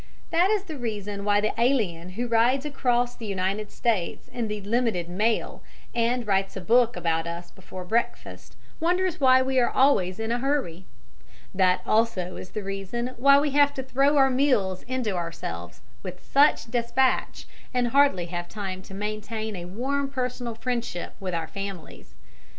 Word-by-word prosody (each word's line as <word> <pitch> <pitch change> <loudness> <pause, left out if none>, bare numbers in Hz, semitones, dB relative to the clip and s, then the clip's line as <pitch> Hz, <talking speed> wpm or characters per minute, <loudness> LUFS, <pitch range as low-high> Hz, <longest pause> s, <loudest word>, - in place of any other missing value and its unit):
That 345 +3 +4
is 420 -2 +1
the 315 -7 -8
reason 205 -3 -4
why 205 0 +3
the 215 - 0
alien 190 -9 +1
who 245 +1 -1
rides 240 +4 +3
across 245 -4 0
the 225 - -8
United 195 +2 -2
States 215 -8 -1
in 235 -2 -3
the 210 0 -3
"Limited 215 -4 0
Mail" 215 +6 -1 0.3
and 240 +1 +1
writes 195 -1 0
a - - -5
book 235 +5 +3
about 165 0 -1
us 170 +1 -6
before 185 0 -10
breakfast 230 +5 -3 0.2
wonders 355 +1 +1
why 260 -1 +6
we 260 0 +1
are 240 - +3
always 190 -9 +2
in 225 +1 -2
a 240 - 0
hurry. 240 - -1 0.7
That 185 -1 +3
also 215 -5 +1
is 180 - -8
the 215 - -5
reason 195 +5 -4
why 275 +3 +6
we 290 0 0
have 285 0 +4
to 265 - -3
throw 275 +3 +2
our 270 -1 +5
meals 245 -9 +1
into 255 -4 -1
ourselves 90 - -5 0.2
with - - -8
such 280 -5 +4
despatch, 240 +2 0 0.2
and 245 -1 +1
hardly 275 -9 +3
have 175 0 -5
time 190 -2 -5
to 195 - -11
maintain 215 +1 -4
a 175 -1 -6
warm 270 +9 -2
personal 250 -3 -3
friendship 235 -7 -3
with 185 -3 -3
our 165 -1 -2
families. 195 - -8
225 Hz, 165 wpm, -26 LUFS, 190-255 Hz, 0.7 s, why